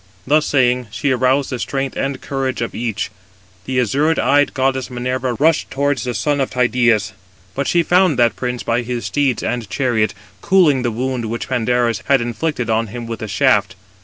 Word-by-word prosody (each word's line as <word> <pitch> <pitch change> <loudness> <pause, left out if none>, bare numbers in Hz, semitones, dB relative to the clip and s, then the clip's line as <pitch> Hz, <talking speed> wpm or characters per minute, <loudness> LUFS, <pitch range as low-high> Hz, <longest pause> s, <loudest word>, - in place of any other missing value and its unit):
Thus 150 +3 +2
saying, 125 -3 +2
she 135 +7 -1
aroused 130 +2 +1
the 125 - -3
strength 135 +1 -3
and 135 -1 -2
courage 135 -2 -3
of 115 - -5
each. 110 -3 -3 0.5
The 130 -1 0
azure 145 +7 +1
eyed 145 +2 +2
goddess 130 -1 0
Minerva 125 0 -2
rushed 155 +5 +2
towards 140 -2 -1
the 125 -1 -3
son 145 -2 0
of 135 - 0
Tydeus; 120 -5 +1 0.4
but 140 0 -2
she 170 -1 +3
found 180 -3 +3
that 120 -1 +3
prince 125 -1 -3
by 115 +1 0
his 120 0 -4
steeds 140 -5 0
and 120 -4 -3
chariot, 120 -5 0 0.3
cooling 180 -9 +4
the 120 - 0
wound 125 +1 -2
which 115 +2 -4
Pandarus 120 -2 +1
had 135 -1 +4
inflicted 120 +2 -2
on 115 0 +1
him 120 +3 -7
with 115 0 -6
a 110 - -4
shaft. 100 +1 +2
125 Hz, 185 wpm, -18 LUFS, 120-140 Hz, 0.5 s, cooling